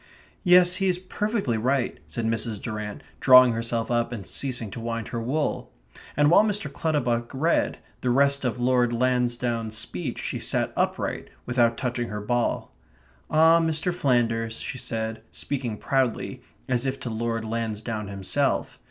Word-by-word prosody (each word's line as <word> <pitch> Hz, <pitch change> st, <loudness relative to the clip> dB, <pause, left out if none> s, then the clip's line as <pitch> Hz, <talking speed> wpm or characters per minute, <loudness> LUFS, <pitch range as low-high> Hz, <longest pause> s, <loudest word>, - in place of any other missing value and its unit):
"Yes; 180 Hz, -1 st, +6 dB
he 195 Hz, 0 st, +1 dB
is 180 Hz, -1 st, +2 dB
perfectly 185 Hz, -, -1 dB
right," 130 Hz, +2 st, 0 dB
said 115 Hz, -, -4 dB
Mrs. 115 Hz, -1 st, -1 dB
Durrant, 105 Hz, -2 st, -5 dB, 0.2 s
drawing 130 Hz, -1 st, +8 dB
herself 115 Hz, 0 st, -2 dB
up 120 Hz, 0 st, +1 dB
and 110 Hz, -5 st, -6 dB
ceasing 120 Hz, -6 st, -2 dB
to -, -, -6 dB
wind 115 Hz, -1 st, -4 dB
her 115 Hz, -, -3 dB
wool. 145 Hz, +6 st, -2 dB, 0.5 s
And 145 Hz, +1 st, +5 dB
while 180 Hz, -, +7 dB
Mr. 210 Hz, -1 st, -1 dB
Clutterbuck 120 Hz, -7 st, 0 dB
read 160 Hz, +5 st, +1 dB, 0.2 s
the 125 Hz, -, 0 dB
rest 140 Hz, +2 st, +3 dB
of 125 Hz, -1 st, -1 dB
Lord 125 Hz, -1 st, +2 dB
Lansdowne's 120 Hz, -2 st, 0 dB
speech 90 Hz, -5 st, -4 dB
she -, -, -3 dB
sat -, -, 0 dB
upright, -, -, -1 dB, 0.2 s
without 120 Hz, -1 st, +2 dB
touching 120 Hz, -2 st, -2 dB
her 105 Hz, -, -4 dB
ball. 120 Hz, +3 st, -1 dB, 0.6 s
"Ah, 160 Hz, +2 st, +6 dB
Mr. 165 Hz, +2 st, 0 dB
Flanders," 115 Hz, -7 st, +1 dB
she 130 Hz, -, -5 dB
said, 110 Hz, -1 st, -3 dB
speaking 125 Hz, -6 st, -4 dB
proudly, 130 Hz, -2 st, -1 dB, 0.3 s
as 125 Hz, 0 st, 0 dB
if 135 Hz, +1 st, -2 dB
to 120 Hz, -, -4 dB
Lord 115 Hz, 0 st, -2 dB
Lansdowne 110 Hz, -1 st, -3 dB
himself. 100 Hz, -2 st, -1 dB
120 Hz, 150 wpm, -25 LUFS, 115-140 Hz, 0.6 s, drawing